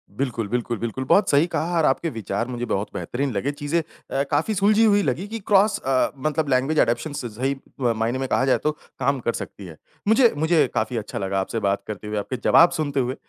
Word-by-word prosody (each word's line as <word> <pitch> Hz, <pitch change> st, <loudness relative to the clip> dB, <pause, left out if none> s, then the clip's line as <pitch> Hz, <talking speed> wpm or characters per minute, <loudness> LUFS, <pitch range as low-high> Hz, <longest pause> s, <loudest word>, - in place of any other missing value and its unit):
बिल्कुल, 120 Hz, -4 st, -2 dB
बिल्कुल, 120 Hz, +1 st, -2 dB
बिल्कुल। 115 Hz, +3 st, -3 dB
बहुत 200 Hz, +10 st, +4 dB
सही 145 Hz, +3 st, +4 dB
कहा 170 Hz, 0 st, -1 dB
और 160 Hz, -, +3 dB
आपके 165 Hz, +5 st, +1 dB
विचार 115 Hz, 0 st, -3 dB
मुझे 120 Hz, -1 st, -4 dB
बहुत 100 Hz, -3 st, -2 dB
बेहतरीन 135 Hz, +2 st, -3 dB
लगे, 125 Hz, +8 st, -1 dB
चीज़ें 145 Hz, +3 st, -1 dB, 0.3 s
अ, 140 Hz, -, +1 dB
काफ़ी 155 Hz, +9 st, +1 dB
सुलझी 210 Hz, +3 st, +4 dB
हुई 205 Hz, -1 st, +4 dB
लगी 160 Hz, +8 st, -1 dB
कि 225 Hz, +2 st, -5 dB
क्रॉस 205 Hz, 0 st, +4 dB
अ, 130 Hz, -1 st, +1 dB
मतलब 150 Hz, +2 st, -1 dB
लैंग्वेज 135 Hz, +4 st, +2 dB
अडॉप्शंस 120 Hz, +4 st, 0 dB
स 115 Hz, -, -6 dB
सही 135 Hz, +2 st, 0 dB, 0.2 s
मायने 120 Hz, 0 st, 0 dB
में 135 Hz, -, -2 dB
कहा 130 Hz, -, +2 dB
जाए 130 Hz, -, +3 dB
तो 150 Hz, -, +2 dB, 0.3 s
काम 135 Hz, +1 st, +1 dB
कर 120 Hz, -1 st, -1 dB
सकती 100 Hz, -, -7 dB
है। 80 Hz, -3 st, -11 dB, 0.3 s
मुझे 225 Hz, +2 st, +5 dB
मुझे 160 Hz, -1 st, +3 dB
काफ़ी 110 Hz, +2 st, -1 dB
अच्छा 105 Hz, -, -5 dB
लगा 95 Hz, 0 st, -1 dB
आपसे 105 Hz, +4 st, -2 dB
बात 100 Hz, 0 st, 0 dB
करते 105 Hz, 0 st, -6 dB
हुए, 105 Hz, 0 st, -3 dB
आपके 120 Hz, +5 st, -3 dB
जवाब 170 Hz, +1 st, +6 dB
सुनते 145 Hz, -3 st, -1 dB
हुए, 125 Hz, +1 st, -1 dB
135 Hz, 220 wpm, -23 LUFS, 115-155 Hz, 0.3 s, जवाब